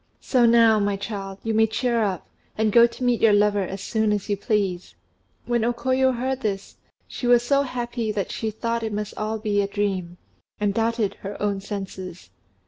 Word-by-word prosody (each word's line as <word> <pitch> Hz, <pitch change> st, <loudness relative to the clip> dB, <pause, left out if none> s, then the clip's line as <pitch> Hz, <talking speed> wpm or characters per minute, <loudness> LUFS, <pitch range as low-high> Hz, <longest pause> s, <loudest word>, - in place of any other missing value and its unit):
So 245 Hz, -3 st, +3 dB
now, 230 Hz, -2 st, +5 dB
my 205 Hz, -1 st, 0 dB
child, 195 Hz, -1 st, -6 dB
you 225 Hz, -, -1 dB
may 220 Hz, 0 st, +4 dB
cheer 235 Hz, +1 st, 0 dB
up, 190 Hz, -4 st, -2 dB, 0.3 s
and 220 Hz, 0 st, +2 dB
go 235 Hz, +2 st, +7 dB
to 240 Hz, -, -9 dB
meet 245 Hz, -2 st, +2 dB
your 220 Hz, -2 st, +5 dB
lover 205 Hz, 0 st, +3 dB
as 190 Hz, +1 st, -5 dB
soon 220 Hz, -1 st, 0 dB
as 205 Hz, -1 st, -2 dB
you 205 Hz, -, +2 dB
please." 195 Hz, -3 st, -2 dB, 0.5 s
When 240 Hz, -2 st, 0 dB
O 240 Hz, +1 st, +1 dB
Koyo 260 Hz, +2 st, +2 dB
heard 260 Hz, +2 st, -2 dB
this, 200 Hz, -2 st, -4 dB, 0.3 s
she 245 Hz, -, -4 dB
was 240 Hz, -1 st, +5 dB
so 280 Hz, +3 st, +3 dB
happy 240 Hz, -4 st, -3 dB
that 205 Hz, -3 st, -3 dB
she 220 Hz, -, -2 dB
thought 230 Hz, +2 st, -2 dB
it 220 Hz, -2 st, -3 dB
must 210 Hz, 0 st, -3 dB
all 215 Hz, +1 st, -2 dB
be 210 Hz, -2 st, 0 dB
a 200 Hz, -, -1 dB
dream, 195 Hz, -4 st, -2 dB, 0.4 s
and 205 Hz, -1 st, +1 dB
doubted 225 Hz, -1 st, 0 dB
her 200 Hz, +1 st, -6 dB
own 200 Hz, -1 st, -1 dB
senses. 190 Hz, -3 st, -7 dB
215 Hz, 200 wpm, -24 LUFS, 200-235 Hz, 0.5 s, go